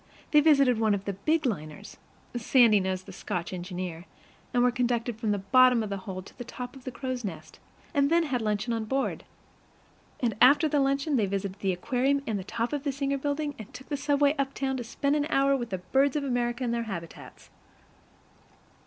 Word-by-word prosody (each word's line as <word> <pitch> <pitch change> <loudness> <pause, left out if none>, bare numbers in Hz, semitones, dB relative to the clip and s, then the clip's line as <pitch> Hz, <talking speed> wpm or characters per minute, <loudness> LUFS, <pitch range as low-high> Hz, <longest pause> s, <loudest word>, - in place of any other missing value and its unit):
They 300 - +7
visited 275 -6 +4
one 215 -2 +3
of 200 0 -6
the 200 - -2
big 305 - 0
liners 155 - -4 0.4
(Sandy 235 -2 +5
knows 190 -1 -2
the - - -11
Scotch 175 +1 -4
engineer), 180 -2 -5 0.5
and 245 -1 +2
were 250 - +4
conducted 240 -1 -1
from 225 -2 -1
the 205 - +2
bottom 245 +4 +4
of 210 - -5
the 200 - -2
hold 185 0 -5
to - - -15
the - - -4
top 245 +1 -8
of 265 - -14
the 255 - -4
crow's 255 0 -4
nest, 160 -6 -7 0.3
and 280 -2 +3
then 335 +1 +4
had 265 -6 -1
luncheon 215 +2 -1
on 225 -1 -2
board. 270 +4 -2 0.9
And 235 -4 0
after 290 +5 +7
luncheon 275 0 +1
they 210 -4 +2
visited 195 0 -3
the 195 - 0
aquarium 260 +9 0
and 215 -3 -2
the - - -6
top 230 +6 -3
of 290 -2 -2
the 285 - 0
Singer 275 0 -2
Building, 290 +1 -2
and 215 - -9
took 265 - -11
the 290 - -1
subway 285 0 +2
uptown 270 0 -1
to 245 - -4
spend 280 +5 -1
an 295 0 0
hour 275 -1 +3
with 240 -3 -3
the 190 - -2
birds 265 +10 +1
of 295 - 0
America 245 -1 -1
in 240 - 0
their 235 0 -1
habitats. 170 -4 -9
245 Hz, 205 wpm, -28 LUFS, 205-275 Hz, 0.9 s, They